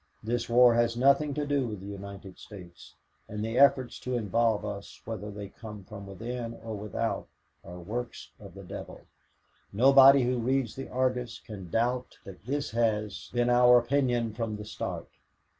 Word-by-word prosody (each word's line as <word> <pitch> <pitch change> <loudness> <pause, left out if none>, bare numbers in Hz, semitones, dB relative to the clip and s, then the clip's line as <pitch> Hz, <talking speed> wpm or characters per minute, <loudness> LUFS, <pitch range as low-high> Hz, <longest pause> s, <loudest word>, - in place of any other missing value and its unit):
This 115 +1 -2
war 120 0 +6
has 120 0 +1
nothing 140 +3 +3
to 150 - -1
do 140 -3 0
with 105 -3 -5
the 95 - -10
United 100 -1 -9
States, 90 -5 -13 0.3
and 105 +1 -4
the 115 +3 -1
efforts 130 -3 +4
to 125 0 -3
involve 115 0 +1
us, 100 -1 -7
whether 105 -2 -5
they 100 -1 -7
come 105 -1 -10
from 100 0 -10
within 115 +4 -5
or 110 -1 -5
without, 105 -1 -3 0.4
are 90 - -10
works 115 +7 -6
of - - -12
the - - -10
devil. - - -8 0.7
Nobody 135 +4 +7
who 125 0 0
reads 130 0 0
the 135 - -7
Argus 125 -2 -1
can 95 -5 -10
doubt 125 +5 -1
that 95 +2 -12
this 145 +2 -2
has 110 -3 -1
been 120 0 +1
our 125 0 +7
opinion 120 -2 +1
from 115 -1 -3
the 105 0 -8
start. - - -5
115 Hz, 170 wpm, -28 LUFS, 105-125 Hz, 0.7 s, Nobody